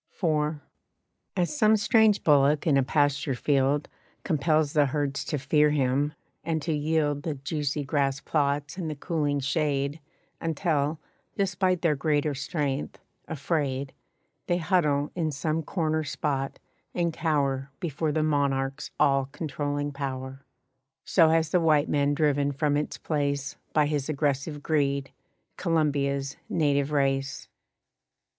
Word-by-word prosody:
IV. 155 -3 +1 0.8
As 180 - 0
some 220 -5 +4
strange 215 0 +4
bullock 145 0 +4
in 155 -4 +3
a 135 - +5
pasture 140 0 +1
field 140 +2 +1 0.4
Compels 155 -1 +1
the 145 -2 +4
herds 140 0 -1
to 150 - -2
fear 150 +3 +3
him, 145 +1 +1 0.3
and 160 0 -1
to 160 - -1
yield 150 -1 0
The 155 -1 -3
juicy 145 +1 -2
grass 140 -1 0
plots 145 +1 -1
and 170 -4 -3
the 155 - -4
cooling 145 -2 -1
shade 145 0 0 0.4
Until, 155 -2 0 0.4
despite 185 -2 +1
their 160 -3 +3
greater 145 +1 +1
strength, 140 0 -3 0.3
afraid, 140 -3 -2 0.5
They 175 - +2
huddle 150 -5 +1
in 165 -3 -1
some 155 +2 -1
corner 160 -1 -1
spot 135 -2 -2 0.4
and 170 -2 0
cower 140 -4 0
Before 160 -3 -2
the 155 +1 +1
monarch's 140 -2 0
all 135 -1 +3
controlling 145 -1 -3
power, 135 -1 -5 0.6
So 165 -4 +5
has 160 -1 +2
the 180 - +3
white 155 -2 +3
man 145 0 +2
driven 145 -2 +1
from 145 +1 +1
its 150 +1 -2
place 140 -2 -2 0.2
By 150 -1 +3
his 145 -1 -2
aggressive 145 0 -1
greed, 140 -3 0 0.5
Columbia's 140 -5 0
native 145 -3 +1
race. 135 -2 0
145 Hz, 130 wpm, -27 LUFS, 140-160 Hz, 0.8 s, a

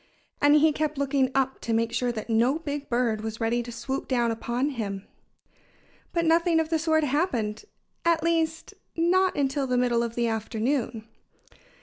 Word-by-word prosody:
And 290 +1 +6
he 310 +1 +5
kept 300 0 -2
looking 275 -1 +1
up 265 -1 0
to 230 - -2
make 230 0 +1
sure 245 -1 0
that 220 -2 -6
no 235 +5 +2
big 290 -3 -5
bird 235 -3 0
was 220 0 -5
ready 230 +1 +1
to 240 0 -8
swoop 235 +4 -4
down 240 -3 +1
upon 240 +5 -2
him. 200 -6 -4 1.1
But 335 -1 0
nothing 330 0 +3
of 320 -1 -1
the 325 -1 +1
sort 315 -1 +2
happened 270 - -1 0.4
at 335 -2 +2
least, 325 -1 0 0.2
not 365 +3 +2
until 275 -1 0
the 250 -1 +1
middle 245 -1 +2
of 235 -1 -3
the 235 -1 +1
afternoon. 225 +1 -2
265 Hz, 170 wpm, -26 LUFS, 230-310 Hz, 1.1 s, And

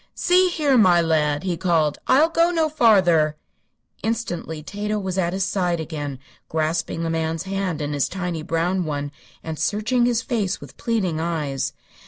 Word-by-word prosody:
"See 365 +1 +4
here, 290 -7 +2
my 180 -4 +6
lad," 155 -2 +1
he 185 -2 -1
called: 165 -4 +1
"I'll 295 +5 +5
go 335 +1 +3
no 325 -3 +1
farther." 180 - +4 0.6
Instantly 175 -9 -3
Tato 210 +5 -3
was 190 -3 -3
at 170 -2 +1
his 190 +1 -1
side 180 -3 0
again, 145 -4 -5 0.3
grasping 160 +1 -1
the 165 - -1
man's 160 0 -1
hand 190 -5 -2
in 145 0 -3
his 145 -2 0
tiny 180 -3 -3
brown 175 +3 0
one 145 -2 -3 0.3
and 160 -1 -5
searching 230 +4 +1
his 240 0 +1
face 215 -7 -1
with - - -12
pleading 190 -9 -1
eyes. 155 -5 -2
175 Hz, 165 wpm, -22 LUFS, 160-215 Hz, 0.6 s, my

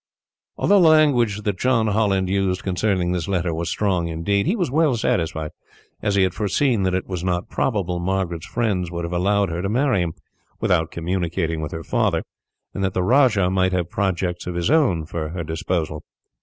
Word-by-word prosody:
Although 200 -1 +4
the 170 - +6
language 125 -10 +3
that 100 -3 -2
John 125 -3 +2
Holland 100 -3 +1
used 95 -1 0
concerning 95 -1 0
this 90 -1 -2
letter 90 -3 0
was 85 +1 -3
strong, 95 -5 0
indeed, 100 - 0
he 190 - +2
was 180 - -1
well 150 -2 +3
satisfied, 80 -6 -1 0.5
as 105 -1 0
he 100 - +4
had 95 -1 +1
foreseen 110 +4 +1
that 95 -1 +1
it 95 - -2
was 90 -2 -5
not 90 -1 -1
probable 95 -7 -1
Margaret's 90 -2 -2
friends 100 -7 -1
would 85 0 -4
have 85 - -5
allowed 100 +2 +1
her 85 +1 -3
to 95 - -2
marry 125 -3 +2
him, 85 -2 -3 0.4
without 80 -3 +1
communicating 85 -1 -2
with 75 - -4
her 80 0 -6
father; - - 0 0.5
and 100 - -3
that 95 -1 -1
the 90 - +1
rajah 110 -5 +3
might 95 0 +1
have 90 -2 -1
projects 90 -3 -1
of 90 - -4
his 85 +8 0
own 125 - +3
for 80 -1 -4
her 85 +1 -4
disposal. 80 +1 -2
95 Hz, 195 wpm, -22 LUFS, 85-105 Hz, 0.5 s, the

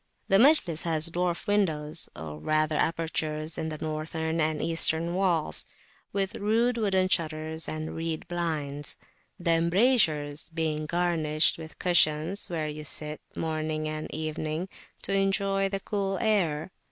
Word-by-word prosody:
The 195 - +6
Majlis 230 - +5
has 160 -1 +2
dwarf 175 0 -2
windows, 160 -7 0
or 80 -2 -7
rather 155 - +1
apertures 155 -1 -1
in 160 - -3
the 155 - -5
northern 160 +1 -3
and 155 0 0
eastern 165 +1 +4
walls, 180 -4 0 0.4
with 200 +3 -1
rude 230 +3 +1
wooden 190 -3 +2
shutters 160 -2 -1
and 155 0 -5
reed 165 -1 -4
blinds; 150 -5 -3 0.4
the 170 -1 +1
embrasures 165 - +2
being 160 -2 -2
garnished 165 -3 +2
with 160 0 -10
cushions, 170 +2 +2
where 160 -3 -2
you 150 0 -6
sit, 150 +1 -2
morning 155 -1 -2
and 155 0 -5
evening, 155 +3 -3 0.3
to - - -2
enjoy 195 0 +1
the 195 0 -2
cool 195 -1 -2
air. 180 -8 0
160 Hz, 135 wpm, -27 LUFS, 155-185 Hz, 0.4 s, The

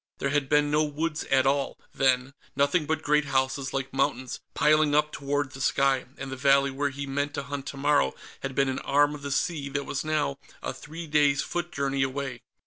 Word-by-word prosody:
There 140 - -1
had 140 -2 0
been 150 0 +3
no 150 +1 +3
woods 150 +1 -2
at 135 -1 +3
all, 140 0 +1 0.2
then; 130 0 +2 0.2
nothing 145 +3 +2
but 160 0 -1
great 150 0 +3
houses 130 0 0
like 135 0 -3
mountains, 135 -2 -1 0.2
piling 155 -1 +4
up 150 0 +3
toward 140 -1 -2
the 135 - -9
sky, 135 -1 +2
and 135 0 -6
the - - -3
valley 140 +1 +4
where 140 +2 -1
he 140 +1 -5
meant 140 +1 -2
to 140 - -3
hunt 140 0 -5
tomorrow 140 - +1 0.2
had 135 -1 -5
been 135 0 +3
an 130 - -1
arm 145 +1 +3
of 150 - -8
the 140 - -4
sea 145 0 -1
that 140 0 -2
was 140 - -3
now 150 -3 0 0.3
a - - -2
three 155 +6 -8
days' 145 -2 +3
foot 175 0 -3
journey 140 -1 -1
away. 135 -2 -2
140 Hz, 210 wpm, -27 LUFS, 135-150 Hz, 0.3 s, piling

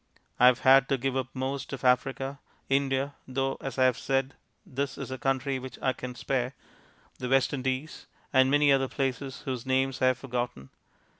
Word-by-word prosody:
I 125 - +8
have 125 0 +4
had 135 0 +6
to 135 - +2
give 135 +1 -2
up 130 -2 -1
most 135 +2 -3
of 135 - -6
Africa, 135 +2 +1 0.3
India 135 0 +1
(though, 135 +1 -1
as 135 - -5
I 130 - +4
have 130 -2 +3
said, 135 0 0 0.3
this 140 +1 -3
is - - -6
a 130 - -5
country 135 +1 0
which 130 0 -8
I 130 - +1
can 125 -1 -7
spare), 125 +1 -2 0.6
the 125 - -3
West 135 +1 +3
Indies, 130 +2 -3 0.3
and 130 0 +5
many 145 0 +4
other 135 -1 +3
places 135 +1 -3
whose 130 -5 -4
names 130 0 0
I 130 - +5
have 130 -1 +3
forgotten. 120 - -4
130 Hz, 190 wpm, -28 LUFS, 130-135 Hz, 0.6 s, I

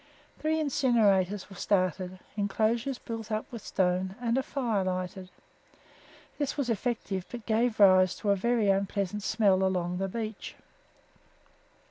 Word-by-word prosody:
Three 315 +1 0
incinerators 210 - +2
were 195 - -12
started, 185 -1 0 0.2
enclosures 220 +5 0
built 225 -2 -7
up 215 0 -1
with 235 -3 -7
stone, 185 +1 0
and 235 -1 0
a 265 - +2
fire 245 -8 -1
lighted. 185 0 -4 1.1
This 285 0 -2
was 260 -4 0
effective, 220 -4 -2
but 240 -3 -8
gave 225 0 +1
rise 185 -2 +6
to 205 - 0
a - - +4
very 230 +2 +1
unpleasant 195 +1 0
smell 195 -2 +2
along 180 -1 0
the 195 - -1
beach. 220 0 -5
205 Hz, 135 wpm, -29 LUFS, 185-235 Hz, 1.1 s, rise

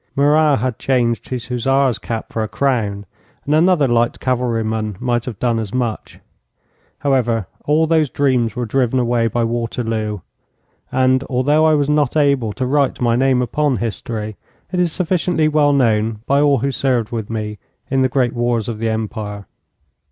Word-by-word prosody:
Murat 145 +1 +4
had 125 +1 -2
changed 120 -4 0
his 125 -2 -4
hussar's 130 +1 +1
cap 115 -1 -5
for 115 - -1
a 110 - -1
crown, 105 -5 -1 0.4
and 145 - 0
another 160 -2 +4
light 120 0 +1
cavalry 125 -3 0
man 110 -2 -3
might 120 -1 -1
have 120 -6 -6
done 120 0 0
as 110 +1 -5
much. 120 -4 -3 0.8
However, 120 -6 +1 0.2
all 155 +2 +3
those 160 -3 +2
dreams 125 -6 +1
were 125 0 -2
driven 125 +2 0
away 120 -2 +1
by 120 +2 -1
Waterloo, 115 -3 -2 0.7
and, 130 0 +2
although 145 +5 +2
I 155 - +4
was 145 -2 +1
not 150 -1 +1
able 140 -7 +2
to 130 - -3
write 140 +1 +1
my 120 -2 +2
name 130 0 +2
upon 145 +2 0
history, 110 0 -4 0.3
it 180 - -1
is 175 -2 +2
sufficiently 175 -2 0
well 150 -1 +3
known 110 -5 +1
by 140 +1 +2
all 145 -2 +4
who 135 +3 -1
served 125 -4 0
with 110 -3 -4
me 105 -2 -4 0.3
in 135 -1 +2
the 130 - +2
great 125 -2 +1
wars 120 -2 0
of 115 -2 -4
the 115 0 -1
Empire. 105 -2 -4
125 Hz, 175 wpm, -18 LUFS, 115-140 Hz, 0.8 s, Murat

